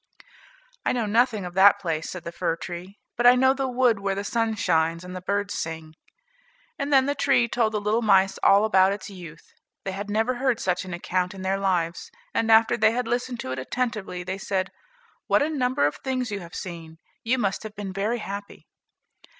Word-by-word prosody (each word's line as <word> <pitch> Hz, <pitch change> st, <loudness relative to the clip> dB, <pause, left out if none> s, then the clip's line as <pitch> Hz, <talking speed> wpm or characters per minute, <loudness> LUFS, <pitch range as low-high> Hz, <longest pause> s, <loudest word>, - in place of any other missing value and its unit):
"I -, -, +1 dB
know 240 Hz, -3 st, 0 dB
nothing 220 Hz, -1 st, +2 dB
of 175 Hz, -, -7 dB
that 200 Hz, +2 st, +6 dB
place," 160 Hz, -5 st, -3 dB
said 180 Hz, -3 st, -7 dB
the 170 Hz, -, -6 dB
fir 165 Hz, -, -1 dB
tree, 175 Hz, +4 st, -8 dB, 0.2 s
"but 240 Hz, +1 st, +4 dB
I 245 Hz, -, +8 dB
know 260 Hz, +1 st, +4 dB
the 270 Hz, 0 st, -2 dB
wood 250 Hz, -4 st, +2 dB
where 195 Hz, 0 st, -1 dB
the 200 Hz, -, -3 dB
sun 225 Hz, +1 st, 0 dB
shines 165 Hz, -5 st, +1 dB
and 180 Hz, 0 st, -8 dB
the 185 Hz, -, -6 dB
birds 200 Hz, +2 st, -1 dB
sing." 160 Hz, -1 st, -5 dB, 0.9 s
And 280 Hz, 0 st, -2 dB
then 265 Hz, -2 st, +5 dB
the 285 Hz, -, 0 dB
tree 265 Hz, -4 st, +2 dB
told 225 Hz, -2 st, 0 dB
the 210 Hz, -, 0 dB
little 210 Hz, +3 st, 0 dB
mice 195 Hz, -3 st, +3 dB
all 200 Hz, +2 st, +5 dB
about 190 Hz, -2 st, +4 dB
its 205 Hz, +1 st, -8 dB
youth. 170 Hz, -4 st, -12 dB, 0.3 s
They 195 Hz, -, -3 dB
had 200 Hz, +2 st, -6 dB
never 220 Hz, +4 st, +1 dB
heard 255 Hz, -2 st, +1 dB
such 180 Hz, 0 st, -1 dB
an 180 Hz, -, -7 dB
account 180 Hz, +1 st, -2 dB
in 190 Hz, -, -8 dB
their 190 Hz, +1 st, 0 dB
lives; 175 Hz, -4 st, -1 dB, 0.2 s
and 225 Hz, 0 st, +1 dB
after 225 Hz, +1 st, +5 dB
they 220 Hz, 0 st, +4 dB
had 245 Hz, -1 st, -2 dB
listened 245 Hz, +1 st, -2 dB
to 130 Hz, -, -5 dB
it 130 Hz, -, -3 dB
attentively, 215 Hz, -, -3 dB
they 190 Hz, +2 st, -4 dB
said, 190 Hz, -1 st, -2 dB, 0.6 s
"What -, -, +3 dB
a 310 Hz, -, -1 dB
number 255 Hz, -, +1 dB
of 145 Hz, -, -1 dB
things 255 Hz, -3 st, -3 dB
you 205 Hz, -, -3 dB
have 170 Hz, -3 st, -11 dB
seen? 165 Hz, -3 st, -7 dB, 0.3 s
you 250 Hz, +2 st, +1 dB
must 200 Hz, -6 st, -1 dB
have 215 Hz, -1 st, -9 dB
been 195 Hz, -2 st, -6 dB
very 210 Hz, +5 st, -1 dB
happy." 200 Hz, -2 st, -7 dB
200 Hz, 215 wpm, -25 LUFS, 180-235 Hz, 0.9 s, I